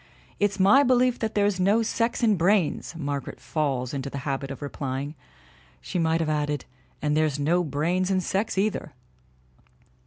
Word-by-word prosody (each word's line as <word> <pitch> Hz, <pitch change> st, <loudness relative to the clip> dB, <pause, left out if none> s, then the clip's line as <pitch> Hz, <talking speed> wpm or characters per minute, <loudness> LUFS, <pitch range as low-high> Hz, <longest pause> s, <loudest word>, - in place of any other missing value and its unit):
"It's 205 Hz, -1 st, +1 dB
my 200 Hz, +9 st, +6 dB
belief 255 Hz, -2 st, +3 dB
that 220 Hz, -1 st, -2 dB
there's 205 Hz, -2 st, +2 dB
no 205 Hz, +5 st, +3 dB
sex 230 Hz, +2 st, -1 dB
in 215 Hz, -3 st, +4 dB
brains," 175 Hz, -2 st, +1 dB
Margaret 145 Hz, -3 st, -4 dB
falls 135 Hz, -5 st, -2 dB
into 140 Hz, -1 st, -3 dB
the 140 Hz, -, -6 dB
habit 135 Hz, -1 st, -2 dB
of 140 Hz, +1 st, -7 dB
replying. 140 Hz, 0 st, -4 dB, 0.7 s
She 175 Hz, -, -4 dB
might 165 Hz, 0 st, +2 dB
have 160 Hz, -, -1 dB
added: 150 Hz, -2 st, -1 dB, 0.4 s
"And 150 Hz, 0 st, +1 dB
there's 155 Hz, -2 st, +1 dB
no 165 Hz, +5 st, +2 dB
brains 170 Hz, +5 st, 0 dB
in 190 Hz, -1 st, +2 dB
sex, 195 Hz, +3 st, -1 dB
either!" 205 Hz, +2 st, -1 dB
165 Hz, 160 wpm, -26 LUFS, 145-205 Hz, 0.7 s, my